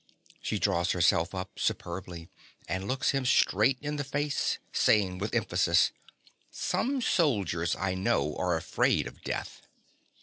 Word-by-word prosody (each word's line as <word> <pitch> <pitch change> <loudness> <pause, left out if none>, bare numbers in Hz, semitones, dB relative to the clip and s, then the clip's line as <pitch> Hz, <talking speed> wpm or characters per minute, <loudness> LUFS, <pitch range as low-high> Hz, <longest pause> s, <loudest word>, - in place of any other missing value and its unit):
(She 105 - -2
draws 90 -4 +1
herself 85 0 +2
up 95 0 -6
superbly, 85 -1 -3 0.4
and 95 +1 -3
looks 135 +2 +1
him 135 -2 -1
straight 125 -1 +3
in 150 0 -3
the 145 - -1
face, 145 +1 -1 0.2
saying 95 -4 +2
with 105 +3 -3
emphasis) - - +3 0.6
Some 265 -1 -1
soldiers, 100 - +1
I 95 -1 -1
know, 95 +1 0
are - - +1
afraid - - +1
of - - -10
death. - - -5
100 Hz, 135 wpm, -29 LUFS, 90-135 Hz, 0.6 s, straight